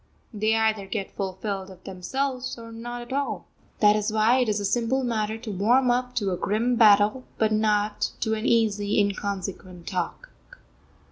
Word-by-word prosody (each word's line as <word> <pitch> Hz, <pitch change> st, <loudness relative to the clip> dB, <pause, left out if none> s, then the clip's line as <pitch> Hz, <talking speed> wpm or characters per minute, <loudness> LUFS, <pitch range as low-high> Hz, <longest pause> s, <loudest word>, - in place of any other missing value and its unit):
They 215 Hz, +1 st, +1 dB
either 220 Hz, -3 st, +1 dB
get 195 Hz, -1 st, -4 dB
fulfilled 195 Hz, 0 st, -4 dB
of 185 Hz, -1 st, -14 dB
themselves, 255 Hz, +8 st, -3 dB
or 230 Hz, -1 st, -10 dB
not 240 Hz, +1 st, -6 dB
at 240 Hz, +2 st, -8 dB
all. 280 Hz, 0 st, -2 dB, 0.4 s
That 210 Hz, 0 st, +6 dB
is 210 Hz, 0 st, 0 dB
why 220 Hz, +4 st, +3 dB
it 250 Hz, -3 st, +1 dB
is 210 Hz, 0 st, +1 dB
a 205 Hz, -, -2 dB
simple 240 Hz, +5 st, +1 dB
matter 220 Hz, -2 st, -1 dB
to 225 Hz, -1 st, -7 dB
warm 240 Hz, +7 st, +3 dB
up 250 Hz, 0 st, -1 dB
to 205 Hz, -5 st, 0 dB
a 180 Hz, -, -1 dB
grim 225 Hz, +7 st, 0 dB
battle, 215 Hz, +2 st, +5 dB
but 220 Hz, -1 st, +2 dB
not 210 Hz, -1 st, +1 dB
to 220 Hz, -1 st, +1 dB
an 220 Hz, +2 st, -2 dB
easy, 210 Hz, -3 st, +2 dB
inconsequent 195 Hz, -3 st, -3 dB
talk. 185 Hz, -, -4 dB
215 Hz, 175 wpm, -25 LUFS, 200-240 Hz, 0.4 s, That